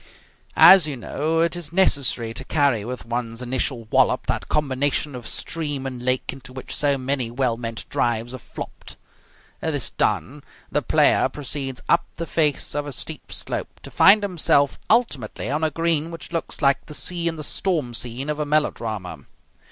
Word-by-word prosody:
As 190 -5 +9
you 145 -3 -4
know, 155 +7 -1
it 170 +1 +2
is 170 -4 -5
necessary 140 -10 +2
to 130 - -5
carry 140 -7 +1
with 125 +2 -6
one's 115 -1 -4
initial 125 -1 -1
wallop - - +3
that - - -2
combination 145 0 0
of 120 -4 -7
stream 145 -5 -2
and 130 -2 -5
lake 130 +1 0
into 130 -2 -11
which 130 0 -5
so 140 -2 +2
many 130 -2 -1
well 120 -1 0
meant 115 -2 -5
drives 120 0 -1
have 130 -2 -8
flopped. - - -9 0.6
This 145 -5 -1
done, 110 - -1 0.3
the - - +1
player - - +3
proceeds 135 -2 -5
up 170 0 +3
the 170 - -4
face 155 -3 +1
of 145 0 -2
a - - -5
steep - - -7
slope, - - -3
to - - -10
find 205 +2 +6
himself 155 -7 +2
ultimately 145 - 0
on 150 +2 -1
a 160 - +3
green 165 0 0
which 165 0 -8
looks 165 -3 -4
like 140 -1 +2
the 150 - -7
sea 170 +5 0
in 165 - -1
the 155 - -6
storm 155 -6 -1
scene 120 +4 -2
of 150 0 -2
a - - +1
melodrama. 115 -10 -2
140 Hz, 175 wpm, -23 LUFS, 125-155 Hz, 0.6 s, As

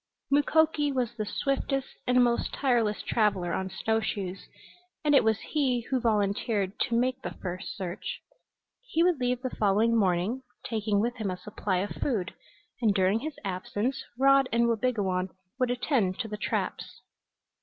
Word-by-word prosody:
Mukoki 295 +1 +3
was 250 -4 -1
the 215 -1 -4
swiftest 275 +2 -1 0.2
and 250 0 +5
most 240 -1 +1
tireless 235 -6 +1
traveler 195 -6 +1
on 190 0 -2
snow 220 +4 0
shoes, 195 -3 -4 0.6
and 295 - +4
it 280 - +6
was 220 -1 +2
he 265 -5 0
who 260 - +2
volunteered 205 -2 0
to 235 - +1
make 255 +1 0
the - - -5
first 185 0 -5
search. 185 -2 -5 0.6
He 450 -10 +1
would 350 -5 +3
leave 250 0 0
the 255 - -3
following 215 +3 +3
morning, 195 +4 +1 0.3
taking 215 -2 0
with 240 +2 -1
him 215 -3 -2
a 180 - -3
supply 195 0 -2
of 205 - -3
food, 205 -8 -2 0.5
and 215 -4 +3
during 190 +2 +3
his 300 +3 -5
absence 205 +7 -2
Rod 275 0 +5
and 235 0 +3
Wabigoon 210 -6 0 0.3
would 255 -1 +2
attend 245 -6 +1
to 225 - -4
the 210 - -4
traps. 210 - -3
225 Hz, 160 wpm, -28 LUFS, 200-255 Hz, 0.6 s, it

